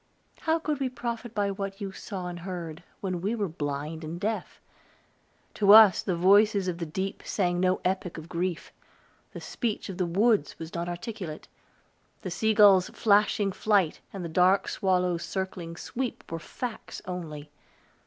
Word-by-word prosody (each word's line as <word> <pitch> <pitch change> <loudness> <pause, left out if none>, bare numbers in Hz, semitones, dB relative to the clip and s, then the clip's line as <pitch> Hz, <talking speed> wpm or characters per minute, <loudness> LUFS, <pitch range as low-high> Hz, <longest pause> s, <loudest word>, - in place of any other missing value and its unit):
How 320 0 +1
could 305 -3 -2
we 265 -2 0
profit 235 -2 -5
by 200 -1 +1
what 195 0 -5
you 200 -2 -4
saw 190 -1 -6
and 175 -1 -5
heard, 170 -3 -6 0.2
when 185 -3 -2
we 205 +5 0
were 205 -3 -1
blind 150 0 -4
and 160 +2 -5
deaf? 210 -1 -3 0.9
To 200 -1 +6
us, 215 -4 +9
the 185 - -1
voices 200 +2 +4
of 175 -1 -2
the 170 - -3
deep 190 +5 -4
sang 175 -3 0
no 185 0 +2
epic 185 -2 -1
of 160 0 -8
grief; 175 0 -3 0.6
the - - -6
speech 225 -4 -3
of 190 -1 -6
the 180 - +1
woods 200 -1 +2
was 165 0 -8
not 170 0 -3
articulate; 175 -3 -6 0.8
the 185 - -4
sea 220 +5 +1
gull's 200 -3 +6
flashing 205 -1 +2
flight, 195 -4 +1
and 190 -3 -6
the - - -4
dark 180 +4 +3
swallow's 180 -2 +1
circling 185 -3 -4
sweep, 250 +5 -4
were 165 - -3
facts 235 +7 -7
only. 155 -5 -6
185 Hz, 165 wpm, -28 LUFS, 170-210 Hz, 0.9 s, us